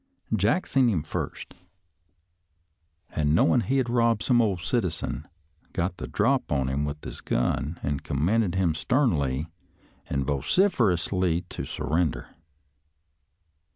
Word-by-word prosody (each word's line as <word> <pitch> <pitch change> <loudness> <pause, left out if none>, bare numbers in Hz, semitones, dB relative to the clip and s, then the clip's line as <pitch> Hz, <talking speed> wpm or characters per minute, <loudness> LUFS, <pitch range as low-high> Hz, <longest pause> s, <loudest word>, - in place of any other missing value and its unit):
Jack 110 - +2
seen 130 -3 +3
him 85 -9 0
first, 80 - -5 1.6
an' 75 0 +1
knowin' 85 +5 +4
he'd 130 +1 +1
robbed 115 -2 +2
some 120 -2 +4
ole 105 -5 +1
citizen, 80 -3 -2 0.5
got 90 +1 -1
the - - -6
drop - - +1
on 70 -3 +1
him 70 +2 -1
with 75 +1 -5
his - - -7
gun, 70 +6 -1
an' 70 -1 -1
commanded 90 +9 0
him 90 -4 +2
sternly 80 - 0 0.6
an' 70 - 0
vociferously 90 - +1
to - - -5
surrender. 80 +1 -1
85 Hz, 120 wpm, -26 LUFS, 75-115 Hz, 1.6 s, knowin